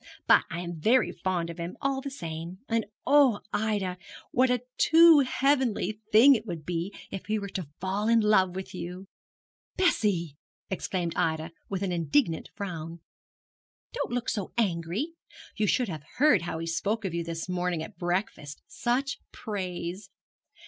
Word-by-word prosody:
But -, -, +6 dB
I 170 Hz, -, -4 dB
am 175 Hz, -2 st, -6 dB
very 240 Hz, +10 st, +3 dB
fond 175 Hz, -3 st, -2 dB
of 170 Hz, -, -11 dB
him, 170 Hz, +1 st, -5 dB
all 275 Hz, -1 st, -1 dB
the 280 Hz, -, -4 dB
same; 170 Hz, -, -6 dB
and 230 Hz, -2 st, 0 dB, 0.2 s
oh, 275 Hz, -7 st, +5 dB
Ida, 205 Hz, -4 st, -1 dB, 0.3 s
what 255 Hz, +1 st, +3 dB
a 250 Hz, -1 st, +1 dB, 0.2 s
too 330 Hz, -1 st, +8 dB
heavenly 260 Hz, -5 st, +1 dB
thing 240 Hz, +7 st, +8 dB
it 220 Hz, -4 st, 0 dB
would 165 Hz, -5 st, -5 dB
be 175 Hz, +3 st, -2 dB, 0.2 s
if 195 Hz, -, -6 dB
he 215 Hz, 0 st, +1 dB
were 200 Hz, -1 st, -5 dB
to 185 Hz, -5 st, -5 dB
fall 195 Hz, +4 st, -1 dB
in 230 Hz, 0 st, +5 dB
love 190 Hz, -4 st, +3 dB
with 190 Hz, 0 st, -6 dB
you!' 180 Hz, +1 st, -6 dB, 0.7 s
'Bessie!' 195 Hz, -, +1 dB, 0.3 s
exclaimed 180 Hz, -2 st, -2 dB
Ida, 160 Hz, +1 st, 0 dB, 0.2 s
with 195 Hz, -1 st, -2 dB
an 190 Hz, -, -1 dB
indignant 170 Hz, -, +1 dB
frown. 170 Hz, -4 st, -6 dB, 0.9 s
'Don't 475 Hz, -, -3 dB
look 245 Hz, -1 st, -2 dB
so 200 Hz, -4 st, -3 dB
angry. 195 Hz, -, -1 dB, 0.4 s
You 210 Hz, -1 st, +1 dB
should 250 Hz, +4 st, +2 dB
have 160 Hz, -6 st, -5 dB, 0.2 s
heard 265 Hz, -, +5 dB
how 170 Hz, -1 st, -4 dB
he 165 Hz, -, -4 dB
spoke 205 Hz, +6 st, -1 dB
of 185 Hz, -, -2 dB
you 170 Hz, 0 st, -1 dB
this 165 Hz, 0 st, -5 dB
morning 180 Hz, -2 st, -1 dB
at 165 Hz, -, -11 dB
breakfast; 175 Hz, -5 st, -3 dB
such 265 Hz, +4 st, -1 dB
praise! 190 Hz, -2 st, -5 dB
190 Hz, 165 wpm, -28 LUFS, 170-230 Hz, 0.9 s, too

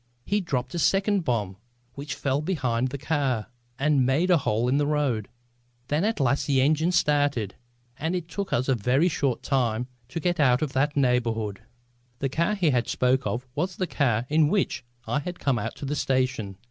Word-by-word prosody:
He 205 Hz, +1 st, +1 dB
dropped 130 Hz, -7 st, -2 dB
a 170 Hz, -, -2 dB
second 195 Hz, +4 st, +2 dB
bomb 105 Hz, -8 st, -1 dB, 0.4 s
which 140 Hz, +2 st, -5 dB
fell 140 Hz, +1 st, 0 dB
behind 130 Hz, -8 st, 0 dB
the 140 Hz, -, -5 dB
car 135 Hz, -6 st, -1 dB, 0.3 s
and 140 Hz, -1 st, +3 dB
made 145 Hz, +9 st, +2 dB
a 175 Hz, -, +5 dB
hole 115 Hz, -1 st, 0 dB
in 130 Hz, +3 st, +2 dB
the 145 Hz, 0 st, +1 dB
road. 140 Hz, -8 st, 0 dB, 0.6 s
Then 150 Hz, +4 st, +1 dB
at 220 Hz, 0 st, 0 dB
last 135 Hz, +1 st, +1 dB
the 140 Hz, -2 st, +3 dB
engine 155 Hz, +5 st, +3 dB
started, 145 Hz, -, +1 dB, 0.5 s
and 160 Hz, +4 st, -1 dB
it 175 Hz, -2 st, -3 dB
took 200 Hz, +3 st, -4 dB
us 125 Hz, +2 st, +1 dB
a 135 Hz, -, +3 dB
very 125 Hz, -, +2 dB
short 140 Hz, -7 st, -1 dB
time 125 Hz, -4 st, 0 dB, 0.2 s
to 130 Hz, +6 st, -4 dB
get 175 Hz, 0 st, 0 dB
out 130 Hz, -2 st, +4 dB
of 145 Hz, -, -3 dB
that 145 Hz, +2 st, +1 dB
neighbourhood." 115 Hz, -6 st, +1 dB, 0.6 s
The 135 Hz, -, -1 dB
car 170 Hz, +9 st, +1 dB
he 170 Hz, -8 st, +2 dB
spoke 130 Hz, +1 st, +1 dB
of 125 Hz, +2 st, -3 dB
was 180 Hz, +6 st, -2 dB
the 185 Hz, -, -1 dB
car 120 Hz, -9 st, 0 dB
in 155 Hz, +1 st, +3 dB
which 195 Hz, -8 st, 0 dB, 0.2 s
I 145 Hz, -, 0 dB
had 175 Hz, +4 st, -6 dB
come 130 Hz, -4 st, 0 dB
out -, -, -4 dB
to -, -, -7 dB
the 145 Hz, +2 st, -2 dB
station. 130 Hz, -8 st, -1 dB
140 Hz, 195 wpm, -26 LUFS, 125-160 Hz, 0.6 s, a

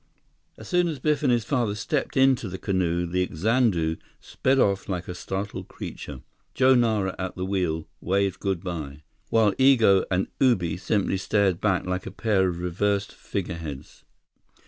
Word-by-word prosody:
As -, -, -11 dB
soon 180 Hz, -1 st, +2 dB
as 160 Hz, -3 st, -3 dB
Biff 150 Hz, +4 st, 0 dB
and 140 Hz, -4 st, +2 dB
his 120 Hz, -3 st, +1 dB
father 120 Hz, -7 st, 0 dB
stepped 140 Hz, +7 st, -2 dB
into 130 Hz, -5 st, +3 dB
the 95 Hz, -, -5 dB
canoe 90 Hz, -3 st, 0 dB
the 90 Hz, +1 st, -1 dB
Xanadu 90 Hz, -4 st, +1 dB, 0.2 s
sped 135 Hz, +1 st, 0 dB
off 100 Hz, -6 st, +1 dB
like 90 Hz, -2 st, -3 dB
a 90 Hz, -, -4 dB
startled 95 Hz, +3 st, -5 dB
creature. 70 Hz, -3 st, -8 dB, 0.3 s
Joe 130 Hz, 0 st, +5 dB
Nara 110 Hz, -6 st, +1 dB
at 95 Hz, 0 st, -4 dB
the 90 Hz, -, -3 dB
wheel, 90 Hz, -5 st, -1 dB
waved 95 Hz, 0 st, 0 dB
good 95 Hz, -3 st, -2 dB
by, 75 Hz, -5 st, -6 dB, 0.3 s
while 110 Hz, -3 st, +3 dB
Igo 115 Hz, -8 st, +5 dB
and 95 Hz, +1 st, +1 dB
Ubi 90 Hz, -11 st, +2 dB
simply 95 Hz, 0 st, 0 dB
stared 95 Hz, -2 st, +1 dB
back 95 Hz, -4 st, +1 dB
like 90 Hz, 0 st, -3 dB
a -, -, -5 dB
pair 100 Hz, -5 st, +1 dB
of 85 Hz, -, -4 dB
reversed 100 Hz, +4 st, -1 dB
figureheads. 85 Hz, -8 st, -6 dB
95 Hz, 165 wpm, -25 LUFS, 90-115 Hz, 0.3 s, Joe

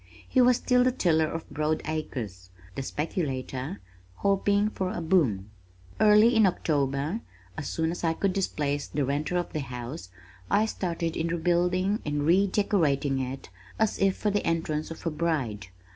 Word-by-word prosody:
He 260 Hz, -, +3 dB
was 250 Hz, -1 st, +5 dB
still 250 Hz, -1 st, +3 dB
the 255 Hz, -, +3 dB
tiller 160 Hz, -10 st, +2 dB
of 165 Hz, -, -5 dB
broad 155 Hz, +2 st, -1 dB
acres, 115 Hz, -, -5 dB, 0.2 s
the 135 Hz, -, -4 dB
speculator 135 Hz, 0 st, -3 dB, 0.3 s
hoping 200 Hz, -, +2 dB
for 190 Hz, -3 st, -2 dB
a 175 Hz, -, -4 dB
boom. 140 Hz, -, +1 dB, 0.5 s
Early 215 Hz, +2 st, +6 dB
in 220 Hz, -3 st, +6 dB
October, 145 Hz, -, 0 dB, 0.4 s
as 140 Hz, -, -5 dB
soon 160 Hz, 0 st, -1 dB
as 175 Hz, -, -6 dB
I 165 Hz, -1 st, +2 dB
could 190 Hz, +3 st, 0 dB
displace 145 Hz, -7 st, -1 dB
the 145 Hz, -1 st, -1 dB
renter 150 Hz, +6 st, -1 dB
of 175 Hz, -, -3 dB
the 155 Hz, -, -1 dB
house, 125 Hz, -, -6 dB, 0.4 s
I 210 Hz, +2 st, +3 dB
started 170 Hz, -6 st, -2 dB
in 165 Hz, -, -1 dB
rebuilding 180 Hz, +4 st, +1 dB
and 145 Hz, -1 st, -1 dB
redecorating 170 Hz, -7 st, +2 dB
it 130 Hz, -2 st, -5 dB, 0.3 s
as 220 Hz, -1 st, +1 dB
if 195 Hz, -1 st, +2 dB
for 210 Hz, -, 0 dB
the 205 Hz, -, 0 dB
entrance 160 Hz, -2 st, -1 dB
of 165 Hz, -, -9 dB
a 165 Hz, -, 0 dB
bride. 145 Hz, -, -2 dB
165 Hz, 160 wpm, -27 LUFS, 140-190 Hz, 0.5 s, Early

